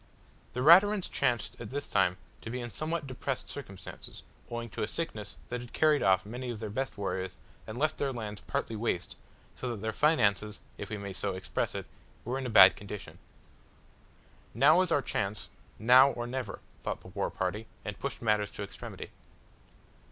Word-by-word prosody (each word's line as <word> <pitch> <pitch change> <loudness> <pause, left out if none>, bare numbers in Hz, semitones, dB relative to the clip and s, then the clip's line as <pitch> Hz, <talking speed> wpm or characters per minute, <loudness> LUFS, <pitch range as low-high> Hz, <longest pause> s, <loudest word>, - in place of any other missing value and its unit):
The 125 - -2
Raturans 190 +5 +7
chanced 120 -4 0
at 115 - -6
this 145 +2 -3
time 90 -1 +2 0.2
to - - -6
be 125 +2 -3
in 120 -1 -5
somewhat 155 +3 -2
depressed 130 0 -3
circumstances, 100 -10 -9 0.3
owing 120 0 -4
to - - -6
a 105 - +1
sickness 110 -11 -4
which 125 0 -3
had 120 - -11
carried 155 -2 +4
off 95 0 +4
many 125 +4 -5
of 115 -3 -4
their 110 -2 -4
best 135 +5 -3
warriors 95 -2 -2 0.3
and 110 - -6
left 155 +3 +1
their 140 - +1
lands 105 -5 -5
partly 115 - -2
waste, 105 -5 -2 0.4
so 125 - -4
that 115 -4 -4
their 110 - 0
finances, 105 -7 +2 0.2
if 100 - -7
we 105 - -3
may 100 -1 -6
so 95 0 -2
express 95 0 -2
it - - -4 0.4
were 125 +4 -1
in 130 - -3
a - - -3
bad 95 -4 +9
condition. 100 0 -8 1.4
"Now 150 +9 +6
is 185 -2 0
our 145 -4 +3
chance 100 +2 -2 0.3
now 125 +5 +7
or 120 -3 -3
never," 130 +1 -4 0.2
thought - - -3
the - - -12
war - - -1
party, 105 +4 -3 0.2
and - - -5
pushed - - -4
matters 105 -2 +2
to 100 - -5
extremity. 100 - -8
115 Hz, 185 wpm, -31 LUFS, 105-135 Hz, 1.4 s, bad